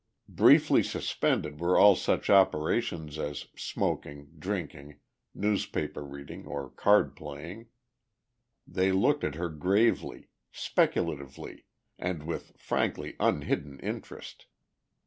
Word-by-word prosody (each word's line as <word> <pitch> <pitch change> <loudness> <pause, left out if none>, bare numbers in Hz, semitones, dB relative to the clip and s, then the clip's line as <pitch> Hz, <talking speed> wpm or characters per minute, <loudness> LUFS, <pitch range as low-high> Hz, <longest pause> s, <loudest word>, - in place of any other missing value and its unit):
Briefly - - +6
suspended 75 0 -1
were 85 +2 +2
all 100 -1 +8
such - - 0
operations 80 -3 +2
as 75 -1 -4
smoking, 70 0 -3
drinking, 75 -6 -5 0.4
newspaper 100 -7 -1
reading 70 0 -10
or 70 -2 -5
card 105 0 +3
playing. 85 +10 -9 1.0
They 95 0 +1
looked 140 +10 +2
at 75 - -1
her 85 +2 -3
gravely, 95 +9 0 0.2
speculatively 70 -6 -2 0.3
and 85 -4 -3
with 85 +1 -6
frankly - - -2
unhidden 70 -1 0
interest. - - -7
80 Hz, 100 wpm, -29 LUFS, 75-95 Hz, 1.0 s, all